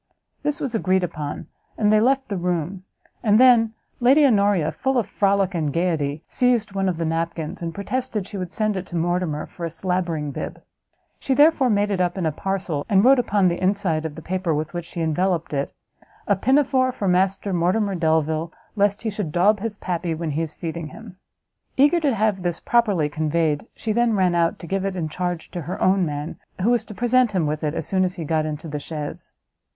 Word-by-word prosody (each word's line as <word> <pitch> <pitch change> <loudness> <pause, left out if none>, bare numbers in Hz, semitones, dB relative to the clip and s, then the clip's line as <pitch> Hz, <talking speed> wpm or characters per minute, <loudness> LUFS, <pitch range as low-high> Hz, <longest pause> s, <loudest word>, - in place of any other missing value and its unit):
This 295 0 -1
was 265 -4 -3
agreed 190 -4 +1
upon, 155 -4 -4 0.3
and 210 -1 +3
they 215 - +6
left 265 +3 +2
the 205 - -3
room; 180 +1 -2 0.4
and 215 -1 +4
then 235 -3 +5 0.2
Lady 270 +5 +5
Honoria, 200 - +3
full 265 +9 -1
of 235 - +2
frolic 195 -1 +1
and 155 -4 -1
gaiety, 160 -3 -1
seized 240 -5 +1
one 195 -1 0
of 175 - -2
the 165 - -1
napkins, 165 0 -3
and 165 -1 -3
protested 220 +2 -3
she 205 - -10
would 180 -2 -5
send 215 -1 0
it 185 -1 -4
to 175 - -8
Mortimer 170 -2 -1
for 175 - -11
a 165 - -1
slabbering 165 -3 -2
bib; - - -6 0.6
she 265 - 0
therefore 290 -2 +5
made 205 -1 +2
it 190 -2 0
up 175 +1 0
in 180 - -1
a 160 - +1
parcel, 185 -3 -2
and 200 +1 +4
wrote 265 0 +6
upon 205 -5 +2
the 175 0 -1
inside 185 -4 +1
of 160 -2 -5
the 160 - -9
paper 185 -3 -1
with 155 +2 -3
which 175 -1 -4
she 170 0 -6
enveloped 165 +1 0
it, 140 0 -1 0.6
"A - - +4
pin 265 +2 +3
a 295 - +5
fore 255 -1 +1
for 205 -5 -3
Master 190 +2 +1
Mortimer 185 +4 +1
Delvile, 160 -1 0 0.2
lest 205 0 +1
he 220 - -1
should 200 -6 -4
daub 200 +6 +3
his 215 0 -4
pappy 175 -3 -2
when 160 -1 -3
he 150 +3 -1
is 160 -2 -4
feeding 165 -1 -5
him." 185 +4 -12 0.6
Eager 290 +6 +5
to 285 -6 +1
have 210 -2 +1
this 175 -2 -2
properly 205 -10 +2
conveyed, 155 +2 -1
she 220 - -3
then 235 +1 +2
ran 185 -3 +2
out, 170 -1 +1
to - - -10
give 195 +2 -2
it 195 -1 -2
in 165 -4 -2
charge 175 0 -4
to 175 - -4
her 170 +4 -5
own 190 0 +3
man, 145 +1 -5 0.2
who 230 - +3
was 235 -2 +1
to 210 - -10
present 245 -1 +2
him 180 -4 +1
with 150 +1 -2
it 150 +1 -1
as - - -4 0.2
he 165 - -5
got 155 0 0
into 155 +1 -5
the 150 -1 -4
chaise. 150 0 -7
185 Hz, 215 wpm, -23 LUFS, 165-215 Hz, 0.6 s, they